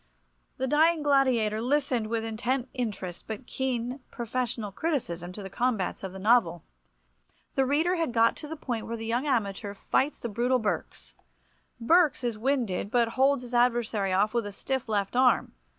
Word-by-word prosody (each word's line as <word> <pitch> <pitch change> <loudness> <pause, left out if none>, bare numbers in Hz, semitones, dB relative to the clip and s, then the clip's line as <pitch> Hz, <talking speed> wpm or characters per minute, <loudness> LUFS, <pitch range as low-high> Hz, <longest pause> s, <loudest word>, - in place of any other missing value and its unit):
The 260 - -1
dying 310 +3 +3
gladiator 255 -7 +2
listened 255 -3 +1
with 225 0 -2
intent 245 +3 -2
interest 205 -8 -4
but 220 +3 -6
keen, 250 0 -2
professional 235 -3 -3
criticism 185 - -2
to 205 - -8
the 195 - -6
combats 225 -4 -1
of 190 - -4
the 190 - -9
novel. 190 -5 +3 0.9
The 270 -1 +2
reader 320 +6 +2
had 330 -6 0
got 230 -1 +3
to 300 - -7
the 320 - -5
point 245 -7 -4
where 230 - -4
the 225 - -6
young 240 +6 -1
amateur 205 -5 -1
fights 275 +8 0
the - - -5
brutal 240 +4 +1
Berks. 130 - -3 0.7
Berks 315 +2 +3
is 240 -2 -1
winded, 230 -5 -1
but 235 0 +2
holds 270 +1 +2
his 245 0 -10
adversary 235 -5 +2
off 205 +4 +2
with 235 -3 0
a - - -6
stiff 260 +4 -3
left 200 0 -1
arm. 250 -1 +3
235 Hz, 170 wpm, -28 LUFS, 215-265 Hz, 0.9 s, dying